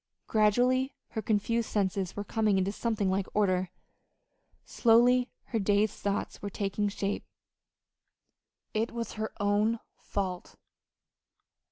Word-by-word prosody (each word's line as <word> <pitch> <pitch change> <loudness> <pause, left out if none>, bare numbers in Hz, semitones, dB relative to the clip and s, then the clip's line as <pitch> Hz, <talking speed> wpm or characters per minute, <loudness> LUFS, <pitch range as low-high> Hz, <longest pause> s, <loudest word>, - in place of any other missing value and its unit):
Gradually 245 +5 +2
her 220 - -3
confused 220 +2 0
senses 195 -2 -1
were 205 - -3
coming 215 -1 +1
into 190 +1 +1
something 215 -3 0
like 190 0 0
order. 185 -3 +2 1.0
Slowly 245 +2 +4 0.2
her 230 - 0
dazed 205 +1 +2
thoughts 200 0 -2
were 200 - -3
taking 200 +1 -1
shape. 200 0 -2 1.5
It 225 +1 0
was 235 -1 -4
her 220 0 -4
own 205 +3 +2 0.2
fault. 185 -3 -4
210 Hz, 115 wpm, -30 LUFS, 200-230 Hz, 1.5 s, Slowly